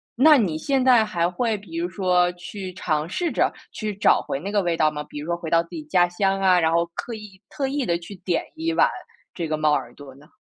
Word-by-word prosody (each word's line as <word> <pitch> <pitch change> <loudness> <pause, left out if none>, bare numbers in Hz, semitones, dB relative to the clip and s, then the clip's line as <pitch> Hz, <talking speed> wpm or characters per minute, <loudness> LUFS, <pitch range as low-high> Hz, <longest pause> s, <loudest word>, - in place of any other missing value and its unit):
那 295 +4 +7
你 175 -9 0
现 270 - 0
在 245 -4 +6
还 175 -4 0
会 220 +3 -1
比 205 +11 -12
如 345 +1 -1
说 180 -2 +2
去 185 +1 -7
尝 155 -1 -1
试 345 - -1
着 - - +1 0.2
去 215 -2 -3
找 205 - +4
回 135 - -4
那 200 +5 -5
个 205 - +3
味 170 -2 -1
道 155 -1 +4
吗？ 150 0 -5
比 145 - -7
如 150 - -7
说 170 - 0
回 165 -2 -6
到 165 0 +3
自 170 - -21
己 315 - -6
家 180 -13 +3
乡 195 +2 0
啊， 185 -2 +5
然 160 0 +2
后 170 +1 +2
刻 235 - -5
意 205 -3 -12
特 275 -2 -2
意 275 -1 -1
地 170 - +1
去 185 +4 -10
点 180 -1 -1
一 325 +1 -1
碗 - - +4 0.4
这 170 -3 -4
个 155 - 0
猫 155 -1 +2
耳 - - -2
朵 135 -2 -12
呢？ 150 +4 -19
185 Hz, 275 characters per minute, -23 LUFS, 170-225 Hz, 0.4 s, 那